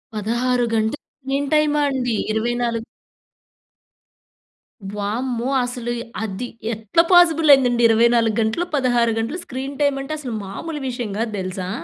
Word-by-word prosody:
16 240 +4 0
గంటలు 220 +5 0 0.2
స్క్రీన్ 275 +1 -2
టైమా 300 -1 +3
అండి? 250 -3 -1 0.2
24 235 +1 -1 2.1
వామ్మో! 235 +4 -2 0.2
అసలు 245 -1 -4 0.3
అది 220 +3 -4 0.3
ఎట్ల 220 +7 -1
పాజిబుల్ 330 -3 +5
అయిందండి 245 -3 +3
24 230 -1 +3
గంటలు, 225 +11 0
16 245 -4 +2
గంటలు 250 +11 -3
స్క్రీన్ 270 +2 -6
టైమ్ 285 -1 +2
అంటే, 290 - -5
అసలు 255 -5 -5
మామూలు 300 +11 -6
విషయం 240 -4 -4
గాద్దెలుసా! 190 -5 -3
240 Hz, 115 wpm, -21 LUFS, 225-275 Hz, 2.1 s, పాజిబుల్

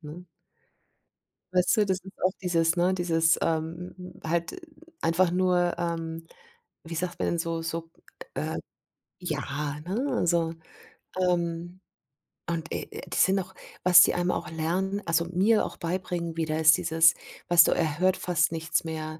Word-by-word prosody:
ne? 160 +3 -10 1.3
Weißt 180 +4 +3
du, 215 - +4
das 190 -1 0
ist 190 +1 -12
auch 185 - +4
dieses 170 -2 +1
ne, 180 +2 +2
dieses, 165 -2 +2
ähm, 165 +2 -2 0.3
halt 170 - -2 0.4
einfach 170 +2 +2
nur, 180 -1 +2
ähm, 165 -1 -4 0.6
wie 165 +1 -7
sagt 175 +2 -3
man - - -1
denn, 170 - -1
so 165 -1 -2
so, 165 0 -5 0.4
äh, - - -3 0.6
ja, 150 -3 -3
ne, 220 +10 -1
also, 170 -1 +1 0.7
ähm, 175 0 -1 0.7
und, 165 -1 -3
äh, - - -6
das - - +3
sind 190 +1 +2
auch 190 0 -7 0.3
was 180 0 +8
die - - +4
einem 175 0 +1
auch - - -3
lernen 185 +5 -1
also 165 0 +1
mir 190 +6 +2
auch - - -8
beibringen 170 -1 -3
wieder, 160 -1 -1
ist 155 -1 +6
dieses, 160 0 +4 0.3
weißt 175 -1 +7
du, - - +2
er 155 -2 -1
hört 185 +1 +3
fast 170 -3 +1
nichts 165 0 -1
mehr. 155 -1 -5
170 Hz, 155 wpm, -27 LUFS, 165-180 Hz, 1.3 s, was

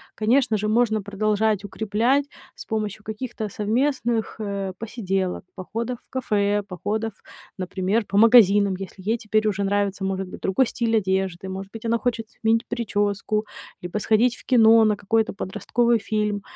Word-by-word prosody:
конечно 230 +1 +2
же, 210 +1 -2
можно 220 -1 +2
продолжать 210 0 0
укреплять 220 +7 +1 0.3
с - - -10
помощью 215 -1 -3
каких-то 220 +2 -5
совместных, 230 +3 -1
э, 200 -3 -3
посиделок, 195 -5 -2
походов 230 +6 -4
в - - -37
кафе, 205 -5 0
походов, 215 +4 -3 0.5
например, 190 +4 -1
по 200 - -1
магазинам, 205 -3 +6
если 190 0 -9
ей 225 +2 +2
теперь 215 -1 0
уже 200 -1 -1
нравится, 200 0 0
может 190 0 -2
быть, - - -9
другой 195 +7 +2
стиль 230 -1 -1
одежды, 190 -2 -1
может 195 +1 -6
быть, 225 0 -8
она 230 +1 +2
хочет 230 -2 -2
сменить 225 +1 0
причёску, 205 -1 -1 0.4
либо 180 +4 -3
сходить 230 +4 +2
в - - -15
кино 225 -3 +6
на 210 - +3
какой-то 220 +3 0
подростковый 230 +4 0
фильм, 210 -1 0
215 Hz, 150 wpm, -23 LUFS, 200-225 Hz, 0.5 s, магазинам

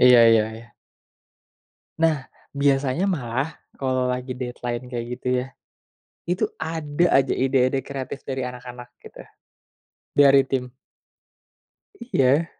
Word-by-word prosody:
Iya 125 -1 +8
iya 110 -1 +5
iya. 115 +1 -12 1.4
Nah, 155 -5 +2 0.2
biasanya 140 +5 +1
malah 135 -1 -2 0.2
kalau 130 -1 0
lagi 125 0 -4
deadline 125 -1 -4
kayak 120 -1 -3
gitu 125 - -5
ya, 130 - -5 0.8
itu 180 +1 0 0.2
ada 160 0 -1 0.2
aja - - -3
ide-ide 130 0 +2
kreatif 135 0 -7
dari 130 -1 -2
anak-anak 125 -1 -8
gitu, - - -12 0.9
dari 140 -1 +6
tim. 125 -2 -2 1.4
Iya. 140 +5 +3
130 Hz, 110 wpm, -23 LUFS, 125-140 Hz, 1.4 s, Iya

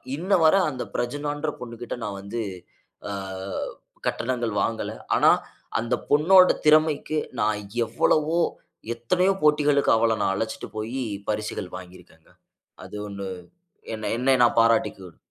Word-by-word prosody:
இன்ன 180 +7 -5
வர 160 - +6
அந்த 130 -4 -4
பிரஜூனான்ற 145 +4 -2
பொண்ணுகிட்ட 120 0 -6
நான் 100 -1 -4
வந்து 100 +4 -4 0.7
ஆ - - -3 1.0
கட்டணங்கள் 120 -2 -1
வாங்கல. 115 -1 -2 0.2
ஆனா, - - +5 0.5
அந்த 120 +2 0
பொண்ணோட 180 +6 +6 0.2
திறமைக்கு 155 0 +3 0.2
நான் 105 0 +1 0.3
எவ்வளவோ, 155 +8 +1 0.6
எத்தனையோ 180 +12 +2
போட்டிகளுக்கு 150 -2 +4
அவள 115 0 +2
நான் 95 - +2
அழைச்சிட்டு 110 +3 -4
போயி, 115 +5 -3 0.3
பரிசுகள் 105 -3 -3
வாங்கி 90 0 -11
இருக்கேங்க. 80 -2 -22 0.5
அது - - -10
ஒண்ணு 100 -1 -6 0.7
என்னை 110 -1 -4
என்னை 130 +2 +3
நான் 120 - +3
பாராட்டிக்கும். 110 -6 0
120 Hz, 120 wpm, -25 LUFS, 110-150 Hz, 1.0 s, வர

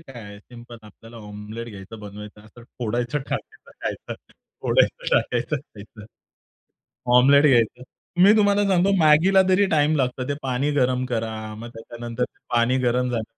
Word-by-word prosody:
काय 135 -7 -12
आहे, 105 -1 -11
सिंपल 120 +2 -13
आपल्याला 115 +2 -15
ऑमलेट 105 +2 -8
घ्यायचं 105 +1 -10
बनवायचं. 105 0 -10
असं 110 +3 -16 0.2
फोडायचं 120 +3 -2
टाकायचं 135 - -7
खायचं. - - -5 0.5
फोडायचं - - +1
टाकायचं 125 +5 0
खायचं. 110 -6 -13 1.1
ऑमलेट 140 +3 +6
घ्यायचं. 125 -2 +2 0.4
मी 200 +3 +7
तुम्हाला 205 -1 +3
सांगतो 190 0 +2
मॅगीला 165 +4 +5
तरी 190 +2 +4
टाईम 155 0 +2
लागतं. 130 -2 -1
ते - - 0
पाणी 135 +2 -1
गरम 130 -2 +1
करा, 115 -3 -3 0.2
मग 115 +2 -9
त्याच्यानंतर 120 +1 -6 0.3
पाणी 120 +2 +2
गरम 125 0 0
झालं 120 -2 -2
125 Hz, 145 wpm, -23 LUFS, 115-145 Hz, 1.1 s, मी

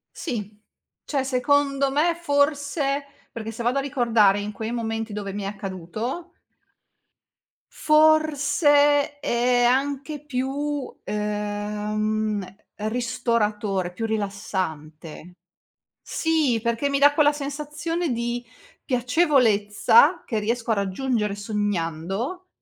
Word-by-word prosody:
Sì. 210 - -5 0.5
Cioè, 275 -3 -1
secondo 275 +1 +1
me, 320 +5 +2
forse 285 -2 0 0.3
perché 225 -1 -6
se 225 - -7
vado 245 +3 +1
a - - +2
ricordare 235 -7 +3
in 205 +1 -4
quei 220 +2 -5
momenti 225 -2 -3
dove 205 -1 -4
mi 205 0 -4
è - - -4
accaduto 205 - -5 1.4
forse 295 -1 +3
è 245 -1 +2
anche 280 +4 0
più, 280 +1 -3
ehm, 210 -1 -2 0.2
ristoratore, 215 -4 -1
più 225 +6 -4
rilassante. 185 -7 -4 0.7
Sì, 310 -8 +1
perché 235 +4 0
mi 280 - +1
dà 290 +1 +6
quella 295 -1 +4
sensazione 300 +4 -3
di 240 +1 -2 0.4
piacevolezza 250 - +3
che 225 - -1
riesco 230 +2 -1
a - - +3
raggiungere 210 +2 -1
sognando, 205 - -3
235 Hz, 100 wpm, -24 LUFS, 210-285 Hz, 1.4 s, dà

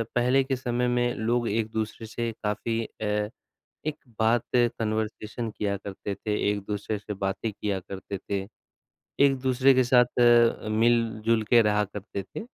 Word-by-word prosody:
पहले 125 +2 +3
के 135 0 -1
समय 125 -1 -1
में 120 0 +1
लोग 120 +2 0
एक-दूसरे 110 0 -2
से 115 +1 -3
काफ़ी 115 +2 -1
अ, 105 -1 -2 0.6
एक 155 - 0 0.3
बात 115 +1 +3
कन्वर्सेशन 110 -1 -1
किया 100 -1 -2
करते 100 0 -6
थे, 105 +2 -3 0.2
एक-दूसरे 105 +1 -3
से 105 +1 -6
बातें 95 +3 -2
किया 100 -1 -2
करते 95 +1 -7
थे, 100 +1 -3 0.8
एक-दूसरे 130 -1 +4
के 130 - +4
साथ 125 0 +3
अ, 120 -2 +5
मिल-जुल 115 0 +2
के 120 -2 +7
रहा 105 -1 +2
करते 100 0 -6
थे, 100 - -8
110 Hz, 145 wpm, -27 LUFS, 105-120 Hz, 0.8 s, के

